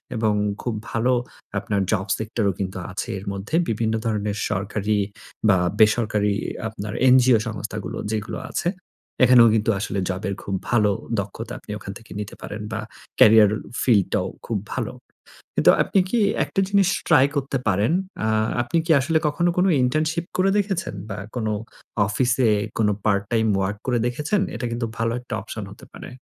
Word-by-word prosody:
এবং 110 Hz, -2 st, +1 dB, 0.3 s
খুব 120 Hz, -, -2 dB, 0.2 s
ভালো 120 Hz, +3 st, +2 dB, 0.5 s
আপনার 100 Hz, 0 st, -1 dB
job 100 Hz, -2 st, 0 dB
sector 110 Hz, 0 st, -3 dB
ও -, -, -7 dB
কিন্তু 95 Hz, -1 st, -3 dB
আছে 105 Hz, +5 st, -4 dB
এর 95 Hz, -, -11 dB
মধ্যে। 100 Hz, +11 st, -4 dB
বিভিন্ন 110 Hz, 0 st, 0 dB
ধরনের 105 Hz, -2 st, -1 dB
সরকারি 105 Hz, +1 st, -1 dB, 0.5 s
বা 95 Hz, -, +5 dB, 0.2 s
বেসরকারি 105 Hz, -2 st, +3 dB, 0.3 s
আপনার 105 Hz, -1 st, -6 dB, 0.2 s
NGO 125 Hz, -2 st, +5 dB
সংস্থাগুলো 105 Hz, -1 st, -5 dB
যেগুলো 105 Hz, -1 st, -3 dB
আছে। 175 Hz, -, 0 dB, 0.6 s
এখানেও 125 Hz, -1 st, +7 dB
কিন্তু 110 Hz, +1 st, +2 dB
আসলে 100 Hz, -1 st, -2 dB
জবের 95 Hz, +1 st, -2 dB
খুব 95 Hz, -, -3 dB, 0.2 s
ভালো 105 Hz, -4 st, +4 dB, 0.3 s
দক্ষতা 110 Hz, +4 st, -5 dB
আপনি -, -, -10 dB
ওখান 95 Hz, -, -7 dB
থেকে 115 Hz, -, -19 dB
নিতে 105 Hz, -1 st, -6 dB
পারেন 105 Hz, +1 st, -6 dB
বা 110 Hz, -, -2 dB, 0.4 s
carrier 110 Hz, -1 st, +8 dB, 0.3 s
field 105 Hz, -7 st, +4 dB
টাও -, -, +1 dB, 0.2 s
খুব -, -, -1 dB, 0.2 s
ভালো -, -, -3 dB, 0.6 s
কিন্তু -, -, +6 dB
আপনি 195 Hz, -, +1 dB
কি 240 Hz, -, +1 dB, 0.3 s
একটা -, -, -2 dB
জিনিস 200 Hz, -2 st, +4 dB, 0.2 s
try 140 Hz, -6 st, +6 dB
করতে 135 Hz, -1 st, -1 dB
পারেন? 100 Hz, +6 st, +2 dB, 0.3 s
আ -, -, +1 dB, 0.4 s
আপনি 120 Hz, +7 st, -1 dB
কি 165 Hz, -, +1 dB
আসলে 160 Hz, +4 st, +1 dB
কখনো 175 Hz, +4 st, +1 dB
কোন 180 Hz, -, +4 dB, 0.2 s
internship 155 Hz, +6 st, 0 dB
করে 190 Hz, +1 st, +3 dB
দেখেছেন 195 Hz, -, -1 dB, 0.2 s
বা 100 Hz, -, -4 dB, 0.2 s
কোন 115 Hz, -3 st, -1 dB, 0.6 s
অফিসে 125 Hz, +2 st, +2 dB, 0.3 s
কোন 110 Hz, -2 st, +3 dB, 0.2 s
part 100 Hz, -2 st, +2 dB
time 110 Hz, -1 st, +2 dB
work 100 Hz, +2 st, -1 dB
করে 120 Hz, -2 st, +2 dB
দেখেছেন? 150 Hz, +11 st, 0 dB
এটা 120 Hz, -, -3 dB
কিন্তু 115 Hz, 0 st, -2 dB
ভালো 115 Hz, 0 st, 0 dB
একটা 125 Hz, -, -8 dB
option -, -, -6 dB
হতে -, -, -13 dB
পারে। -, -, -9 dB
110 Hz, 165 wpm, -23 LUFS, 105-130 Hz, 0.6 s, carrier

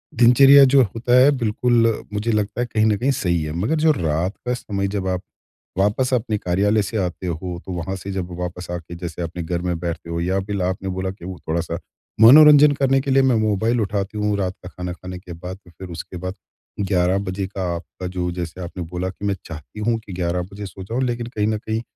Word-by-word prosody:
दिनचर्या 135 Hz, +4 st, +8 dB
जो 135 Hz, 0 st, +5 dB
होता 120 Hz, +4 st, +1 dB
है 135 Hz, +3 st, +7 dB
बिल्कुल 115 Hz, 0 st, +1 dB
मुझे 105 Hz, +3 st, -1 dB
लगता 105 Hz, +2 st, -1 dB
है -, -, +1 dB
कहीं 110 Hz, -1 st, +3 dB
न 105 Hz, -2 st, +3 dB
कहीं 130 Hz, +6 st, +1 dB
सही 85 Hz, -9 st, 0 dB
है। 75 Hz, -, -4 dB
मगर 105 Hz, -, 0 dB
जो 160 Hz, 0 st, +5 dB
रात 85 Hz, -, -1 dB
का 125 Hz, -, +1 dB
समय 100 Hz, -5 st, -2 dB
जब 95 Hz, -1 st, -3 dB
आप 90 Hz, -1 st, -1 dB, 0.6 s
वापस 105 Hz, +7 st, +1 dB
अपने 115 Hz, -3 st, 0 dB
कार्यालय 100 Hz, +4 st, +1 dB
से 100 Hz, +3 st, -3 dB
आते 90 Hz, -1 st, -2 dB
हो 85 Hz, +1 st, -4 dB
तो 95 Hz, -, -6 dB
वहाँ 90 Hz, +2 st, -3 dB
से 95 Hz, +1 st, -6 dB
जब 95 Hz, -2 st, -3 dB
वापस 90 Hz, 0 st, -5 dB
आके 85 Hz, -1 st, -6 dB
जैसे 85 Hz, -1 st, -6 dB
अपने 85 Hz, 0 st, -4 dB
घर 85 Hz, +1 st, -2 dB
में 90 Hz, -1 st, -1 dB
बैठते 85 Hz, 0 st, -5 dB
हो 85 Hz, 0 st, -2 dB
या 95 Hz, +3 st, 0 dB
फिर 100 Hz, 0 st, -3 dB
आपने 95 Hz, +1 st, -2 dB
बोला 95 Hz, 0 st, -2 dB
कि 95 Hz, -3 st, -12 dB
वो 90 Hz, -1 st, -6 dB
थोड़ा-सा 85 Hz, +1 st, -2 dB, 0.4 s
मनोरंजन 150 Hz, +4 st, +9 dB
करने 135 Hz, -1 st, +2 dB
के 135 Hz, 0 st, -2 dB
लिए 135 Hz, 0 st, +5 dB
मैं 130 Hz, -2 st, +3 dB
मोबाइल 110 Hz, +2 st, +1 dB
उठाती 100 Hz, 0 st, -2 dB
हूँ, 105 Hz, -1 st, 0 dB
रात 95 Hz, -2 st, -1 dB
का 90 Hz, -, -8 dB
खाना 90 Hz, -1 st, -5 dB
खाने 90 Hz, 0 st, -8 dB
के 90 Hz, -1 st, -10 dB
बाद। 90 Hz, +3 st, -7 dB
फिर 90 Hz, +2 st, -10 dB
उसके 85 Hz, +2 st, -7 dB
बाद 90 Hz, +1 st, -4 dB, 0.5 s
11 95 Hz, -2 st, +2 dB
बजे 95 Hz, +1 st, -2 dB
का 95 Hz, 0 st, -5 dB
आपका 90 Hz, +2 st, -7 dB
जो 90 Hz, -1 st, -2 dB
जैसे 85 Hz, 0 st, -5 dB
आपने 90 Hz, 0 st, -6 dB
बोला 90 Hz, +2 st, -4 dB
कि 95 Hz, +2 st, -8 dB
मैं 100 Hz, -1 st, +1 dB
चाहती 80 Hz, +5 st, -9 dB
हूँ 115 Hz, +2 st, +1 dB
कि 95 Hz, -, -8 dB
11 90 Hz, 0 st, -1 dB
बजे 100 Hz, +1 st, -7 dB
सो 95 Hz, 0 st, -9 dB
जाऊँ 115 Hz, +7 st, -3 dB
लेकिन 120 Hz, -2 st, -2 dB
कहीं 105 Hz, -1 st, +1 dB
न 110 Hz, 0 st, 0 dB
कहीं 110 Hz, +1 st, -3 dB
95 Hz, 225 wpm, -21 LUFS, 90-110 Hz, 0.6 s, मनोरंजन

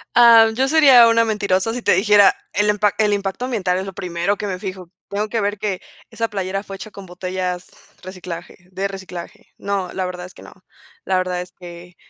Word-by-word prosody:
Ah, 230 Hz, -2 st, +8 dB
yo 265 Hz, +2 st, +1 dB
sería 270 Hz, -6 st, +7 dB
una 230 Hz, 0 st, +4 dB
mentirosa 210 Hz, -1 st, 0 dB
si 245 Hz, -, -4 dB
te -, -, +4 dB
dijera: 205 Hz, +1 st, +5 dB, 0.2 s
"El 210 Hz, 0 st, +1 dB
impac 210 Hz, 0 st, +1 dB
el 210 Hz, -1 st, +2 dB
impacto 200 Hz, +4 st, -2 dB
ambiental 190 Hz, -8 st, -1 dB
es 190 Hz, -, -3 dB
lo 195 Hz, -, -7 dB
primero 180 Hz, +1 st, -2 dB
que 210 Hz, -, -4 dB
me 185 Hz, -2 st, -3 dB
fijo, 185 Hz, -2 st, -7 dB, 0.2 s
tengo 210 Hz, +2 st, -3 dB
que 225 Hz, +1 st, -1 dB
ver 205 Hz, -1 st, -2 dB
que 200 Hz, -3 st, -3 dB, 0.3 s
esa 230 Hz, 0 st, -2 dB
playera 195 Hz, -1 st, -3 dB
fue 195 Hz, -1 st, -8 dB
hecha 215 Hz, -, -9 dB
con 200 Hz, -1 st, -11 dB
botellas 180 Hz, 0 st, -4 dB, 0.3 s
reciclaje, 180 Hz, -2 st, -8 dB
de 195 Hz, +2 st, -2 dB
reciclaje", 190 Hz, -3 st, -9 dB
no, 195 Hz, -3 st, -3 dB
la 190 Hz, -1 st, -2 dB
verdad 180 Hz, -1 st, -6 dB
es 180 Hz, -, -13 dB
que -, -, -15 dB
no, -, -, -13 dB, 0.5 s
la 185 Hz, -, +1 dB
verdad 180 Hz, -1 st, -1 dB
es 180 Hz, 0 st, -10 dB
que 175 Hz, -1 st, -12 dB
195 Hz, 210 wpm, -20 LUFS, 180-210 Hz, 0.5 s, Ah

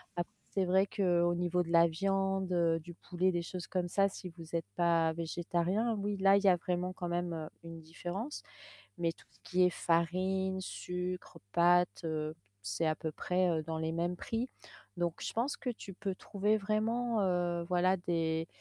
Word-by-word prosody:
après, 175 Hz, 0 st, -3 dB, 0.2 s
c'est 195 Hz, -2 st, +1 dB
vrai 190 Hz, +2 st, +4 dB
qu'au 175 Hz, -3 st, +2 dB
niveau 175 Hz, 0 st, +1 dB
de 170 Hz, -, -4 dB
la 170 Hz, 0 st, +7 dB
viande, 195 Hz, +2 st, 0 dB
heu, 165 Hz, -2 st, +3 dB
du 170 Hz, +2 st, -11 dB
poulet, 185 Hz, +1 st, 0 dB
des 175 Hz, -1 st, -1 dB
choses 180 Hz, 0 st, -6 dB
comme 180 Hz, -1 st, -1 dB
ça, 195 Hz, +2 st, +3 dB
si 185 Hz, -1 st, -8 dB
vous 165 Hz, -1 st, -8 dB
êtes 165 Hz, -, 0 dB
pas 165 Hz, -2 st, +3 dB
végétariens, 175 Hz, +6 st, 0 dB
oui, 205 Hz, 0 st, -2 dB
là, 195 Hz, +1 st, +6 dB
il 200 Hz, -, 0 dB
y -, -, +4 dB
a 185 Hz, -, +7 dB
vraiment 180 Hz, +1 st, -2 dB
quand 180 Hz, -1 st, -5 dB
même, 175 Hz, 0 st, -1 dB
heu, 155 Hz, -1 st, -4 dB
une 165 Hz, -1 st, -8 dB
différence 175 Hz, -, -5 dB, 0.6 s
mais, 165 Hz, -1 st, +1 dB
tout -, -, -21 dB
ce -, -, -26 dB
qui 185 Hz, 0 st, +1 dB
est 180 Hz, -, +6 dB
farine, 185 Hz, +3 st, +1 dB
sucre, 180 Hz, 0 st, -4 dB
pâtes, 175 Hz, +1 st, +4 dB
heu, 155 Hz, -1 st, -2 dB, 0.3 s
c'est 100 Hz, +10 st, -1 dB
à 155 Hz, -, +2 dB
peu 160 Hz, -, -4 dB
près, 180 Hz, +3 st, +1 dB
heu, 160 Hz, -2 st, +1 dB
dans 160 Hz, +1 st, -4 dB
les 160 Hz, 0 st, -1 dB
mêmes 175 Hz, +1 st, -1 dB
prix. 230 Hz, +6 st, -3 dB, 0.5 s
Donc, 175 Hz, -2 st, -1 dB
je -, -, -3 dB
pense 245 Hz, +5 st, 0 dB
que 250 Hz, -, -3 dB
tu 200 Hz, -5 st, -8 dB
peux 195 Hz, -1 st, -3 dB
trouver 210 Hz, +3 st, 0 dB
vraiment, 220 Hz, +2 st, 0 dB
heu, 175 Hz, -2 st, +1 dB
voilà, 180 Hz, +2 st, +3 dB
des 165 Hz, -2 st, 0 dB
175 Hz, 195 wpm, -33 LUFS, 170-190 Hz, 0.6 s, la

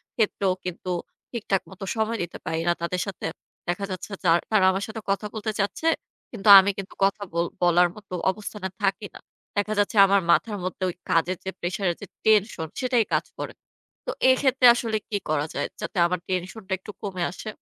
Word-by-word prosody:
ক্ষেত্রেও 200 Hz, -4 st, +1 dB
কিন্তু 180 Hz, 0 st, -5 dB, 0.4 s
ঠিকঠাক 205 Hz, -5 st, -1 dB
মতো 190 Hz, +1 st, -10 dB
সময় 220 Hz, +1 st, 0 dB
দিতে 175 Hz, -, -7 dB
পারি 160 Hz, -, -1 dB
না। -, -, +5 dB
তাদের 175 Hz, +1 st, -1 dB
সাথে 195 Hz, -, -6 dB, 0.4 s
দেখা 185 Hz, +3 st, -1 dB
যাচ্ছে 185 Hz, +3 st, -6 dB
যার 170 Hz, -1 st, +5 dB
তারা 210 Hz, -3 st, +5 dB
আমার 190 Hz, +1 st, -2 dB
সাথে 220 Hz, 0 st, -6 dB
কথা 200 Hz, +2 st, 0 dB
বলতে 220 Hz, 0 st, -2 dB
চাচ্ছে। 200 Hz, +11 st, -1 dB, 0.4 s
কিন্তু 215 Hz, -3 st, -5 dB
আমি 195 Hz, +1 st, +3 dB
কিন্তু 195 Hz, -1 st, -7 dB
কথা 200 Hz, +1 st, +2 dB
বল 170 Hz, 0 st, +1 dB, 0.2 s
বলার 175 Hz, 0 st, +5 dB
মতো 205 Hz, -3 st, -12 dB, 0.2 s
অবস্থানে 205 Hz, 0 st, -6 dB
থাকি 195 Hz, +1 st, 0 dB
না। -, -, -9 dB, 0.4 s
দেখা 205 Hz, +1 st, +1 dB
যাচ্ছে 205 Hz, +2 st, +1 dB
আমার 200 Hz, 0 st, +3 dB
মাথার 210 Hz, +4 st, +2 dB
মধ্যে 185 Hz, +1 st, -4 dB
ওই 175 Hz, -, -6 dB
কাজের 170 Hz, +3 st, +2 dB
যে, 190 Hz, -, -3 dB
প্রেশার 180 Hz, +3 st, -2 dB
এর -, -, -5 dB
যে, -, -, -5 dB, 0.2 s
টেনশন 210 Hz, -6 st, +3 dB
সেটাই 250 Hz, -3 st, +2 dB
কাজ -, -, +2 dB
করে। -, -, -5 dB, 0.5 s
তো -, -, -1 dB, 0.2 s
এক্ষেত্রে 260 Hz, 0 st, +4 dB
আসলে 230 Hz, -2 st, -1 dB
কি 205 Hz, -, -1 dB
করা 150 Hz, -1 st, +1 dB
যায়? 145 Hz, -, -1 dB
যাতে -, -, -6 dB
আমার 180 Hz, +1 st, -1 dB
টেনশন 185 Hz, +4 st, -3 dB
টা -, -, -5 dB
একটু 200 Hz, +3 st, -10 dB
কমে 190 Hz, -4 st, -3 dB
আসে? 215 Hz, -, -8 dB
195 Hz, 195 wpm, -25 LUFS, 180-215 Hz, 0.5 s, না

